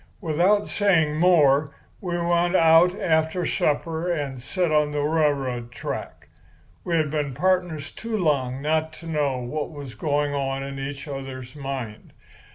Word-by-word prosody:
"Without 185 +4 +2
saying 185 -7 +2
any 150 - -3
more, 145 -5 +4 0.2
we 175 -2 -3
went 175 +1 +1
out 165 +2 +5
after 160 +2 +1
supper 160 +4 0
and 140 -6 -3
set 175 +5 -1
on 150 -1 +3
the 145 0 -1
railroad 140 -6 0
track. 120 - -6 0.6
We 170 - -1
had 155 -3 +1
been 145 -4 -2
pardners 180 -5 0
too 225 -1 -4
long 140 -7 0
not 160 +1 0
to 165 - -12
know 150 -5 0
what 125 +5 -4
was 145 -5 -9
going 145 -2 -1
on 135 -1 -2
in 135 0 -6
each 140 +2 -6
other's 135 -2 -7
mind. 135 -6 -6
150 Hz, 155 wpm, -24 LUFS, 140-170 Hz, 0.6 s, out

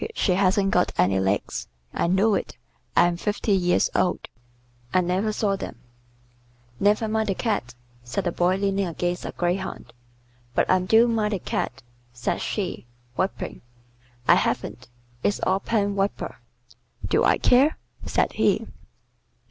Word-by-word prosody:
She 195 - +1
hasn't 195 +1 +2
got 180 - +2
any 95 +1 +3
legs. 95 -10 -1 0.3
I - - 0
know 195 +5 +3
it. 185 - -2 0.4
I'm 175 0 +4
fifty 210 +3 -1
years 180 -2 +3
old. 180 - 0 0.6
I 185 - +3
never 185 +5 0
saw 205 -2 0
them." - - -6 1.0
"Never 210 +2 +3
mind 220 0 0
the 195 - +1
Cat," 155 - -2 0.3
said 120 +1 -3
the 175 - 0
Boy 175 +2 +2
leaning 195 0 0
against 175 +1 -2
a - - -4
greyhound. 180 -3 -3 0.6
"But - - +2
I 185 - +5
do 220 +6 +4
mind 215 -2 0
the 195 - -1
Cat," 120 - -3 0.3
said 125 0 -2
she, 185 - -3 0.3
weeping. 190 +7 -3 0.7
"I - - +8
haven't. 125 0 -1 0.3
It's 205 - +1
all 190 +1 +2
pen 205 -1 0
wiper." 200 0 -2 0.7
"Do - - +2
I - - +4
care?" 270 +5 +4 0.3
said - - 0
he. - - +2
190 Hz, 145 wpm, -24 LUFS, 175-205 Hz, 1.0 s, I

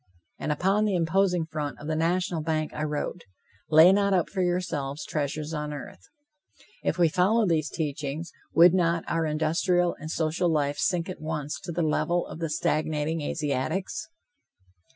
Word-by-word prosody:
And - - -2
upon 195 +7 +2
the 205 -3 +1
imposing 180 0 +2
front 150 -2 -4
of - - -10
the 155 0 -1
national 170 +1 0
bank, 155 -1 -1
I 150 - -3
wrote: 150 +3 -3 0.5
"Lay 160 +4 +8
not 200 -1 +3
up 175 - 0
for 190 - -1
yourselves 170 -6 -2
treasures 150 +1 -3
on 150 -1 -3
earth." 145 -11 -8 0.8
If - - 0
we 175 -1 +5
followed 190 +6 +2
these 155 -2 +1
teachings, 150 +1 -4 0.2
would 170 +1 +7
not 170 -2 +2
our 165 -1 0
industrial 170 +3 +1
and 155 - -7
social 165 +2 0
life 145 -2 0
sink 180 -2 +1
at 185 - -7
once 150 -2 -3
to 175 - -4
the 170 +1 -1
level 170 +3 +1
of - - -9
the 165 -1 -2
stagnating 155 0 0
Asiatics? 155 - -2
160 Hz, 165 wpm, -27 LUFS, 150-180 Hz, 0.8 s, Lay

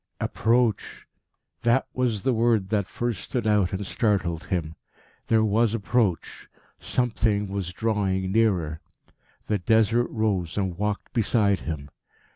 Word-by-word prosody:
Approach! 115 0 0 0.6
that 120 +3 +2
was 120 -6 -1
the 130 - +2
word 115 -4 +2
that 100 -3 0
first 120 -1 -3
stood 120 -3 -3
out 105 -4 +2
and 95 +1 -3
startled 95 -6 0
him. 80 -4 -2 0.5
There 110 -1 +3
was 110 +1 +2
approach; 105 -4 -1 0.3
something 110 -4 0
was 95 -3 -3
drawing 95 -3 -1
nearer. 90 -8 +1 0.6
The 105 -2 0
Desert 115 +5 +3
rose 100 -7 -1
and 95 -3 -1
walked 105 +2 -3
beside 105 -3 +2
him. 70 -3 -6
105 Hz, 125 wpm, -25 LUFS, 95-115 Hz, 0.6 s, There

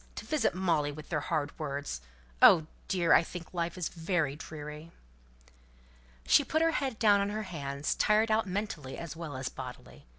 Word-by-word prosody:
To - - -7
visit 310 - +1
Molly 165 -6 +1
with 150 +1 -10
their 155 - 0
hard 150 -2 -2
words! 140 - -4 0.4
Oh, 160 -3 +8 0.2
dear! 170 -4 +3
I - - +7
think 170 +1 -8
life 170 0 -2
is 180 - -1
very 160 -4 -1
dreary." 150 +1 -8 1.4
She 290 - +6
put 315 +4 +1
her 330 - +4
head 270 -7 -2
down 205 -3 +5
on 200 - 0
her 215 +1 -3
hands; 140 -6 -3
tired 215 +1 +3
out 215 -1 +2
mentally 180 -8 -4
as 170 -1 -6
well 160 -5 -6
as 130 0 -3
bodily. 100 - -9
165 Hz, 175 wpm, -30 LUFS, 145-200 Hz, 1.4 s, Oh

